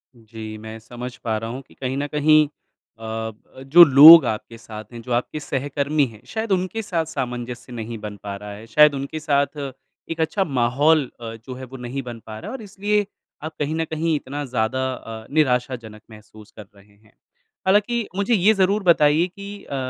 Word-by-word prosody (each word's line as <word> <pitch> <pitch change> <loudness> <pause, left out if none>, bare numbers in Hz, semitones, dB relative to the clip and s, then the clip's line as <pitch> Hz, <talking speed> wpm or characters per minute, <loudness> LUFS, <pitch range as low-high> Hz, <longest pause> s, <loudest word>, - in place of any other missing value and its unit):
जी, 110 -1 -9
मैं 110 +1 -9
समझ 120 +2 -8
पा 110 -2 -2
रहा 115 +1 -5
हूँ 130 +3 -6
कि - - -20
कहीं 130 0 -4
न 145 +1 -2
कहीं 150 +1 +4 0.5
अ, 110 0 -4 0.3
जो 155 +6 +8
लोग 155 +3 +10
आपके 110 +1 -4
साथ 110 -2 -9
हैं 115 - -8
जो 125 - -9
आपके 125 +5 -2
सहकर्मी 145 +1 -1
हैं 110 - -16
शायद 220 -1 -4
उनके 185 +4 0
साथ 170 -5 -2
सामंजस्य 125 -4 -5
नहीं 115 0 -6
बन 105 0 -7
पा 100 -1 -5
रहा 105 +1 -9
है। 105 +2 -10
शायद 150 +3 +5
उनके 140 +3 -5
साथ 140 -1 0 0.5
एक 165 0 -3
अच्छा 195 +5 +1
माहौल 140 +2 +2 0.2
अ, 115 -1 -6
जो 120 +3 -10
है, 130 0 -9
नहीं 125 +3 -4
बन 120 -2 -8
पा 110 -1 -8
रहा - - -8
है 265 - -5
और - - -12
इसलिए 205 0 -1 0.4
आप 155 0 -6
कहीं 150 +2 -1
न 165 0 -1
कहीं 160 0 -1
इतना 145 +1 -5
ज़्यादा 125 +1 -1
अ, 110 -2 -9
निराशाजनक 125 -6 0
महसूस 105 0 -15
कर 105 -2 -12
रहे 100 +1 -21
हैं। 105 +1 -27 0.5
हालाँकि, 210 +3 +2
मुझे 200 +4 0
ये 210 +1 +4
ज़रूर 195 +1 +1
बताइए 160 -1 +4
कि 200 +2 -10
अ, 140 - -6
135 Hz, 195 wpm, -22 LUFS, 115-160 Hz, 0.5 s, लोग